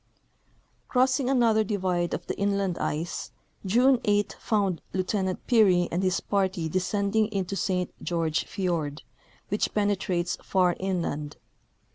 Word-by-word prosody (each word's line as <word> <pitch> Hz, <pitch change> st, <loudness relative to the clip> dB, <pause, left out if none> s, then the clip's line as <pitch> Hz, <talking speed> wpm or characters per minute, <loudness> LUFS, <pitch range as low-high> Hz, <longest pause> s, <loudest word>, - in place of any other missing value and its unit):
Crossing 255 Hz, 0 st, +2 dB
another 230 Hz, -5 st, +3 dB
divide 185 Hz, -4 st, -1 dB
of 175 Hz, -, -7 dB
the -, -, -3 dB
inland 200 Hz, -3 st, 0 dB
ice, 160 Hz, +3 st, -3 dB, 0.4 s
June 250 Hz, +5 st, +4 dB
8 205 Hz, 0 st, +1 dB
found 200 Hz, -6 st, 0 dB
Lieu 185 Hz, -, +1 dB
tenant 190 Hz, -1 st, -2 dB
Peary 190 Hz, -7 st, +4 dB
and 175 Hz, -, 0 dB
his 185 Hz, -1 st, +1 dB
party 190 Hz, -4 st, -1 dB
descending 200 Hz, +5 st, +1 dB
into 195 Hz, -3 st, -3 dB
Saint 180 Hz, -2 st, -1 dB
George 165 Hz, -2 st, -1 dB
fiord, 165 Hz, -7 st, -2 dB, 0.5 s
which 205 Hz, -, -1 dB
penetrates 195 Hz, -4 st, 0 dB
far 180 Hz, -2 st, +2 dB
inland. 170 Hz, -6 st, -2 dB
190 Hz, 125 wpm, -27 LUFS, 175-210 Hz, 0.5 s, June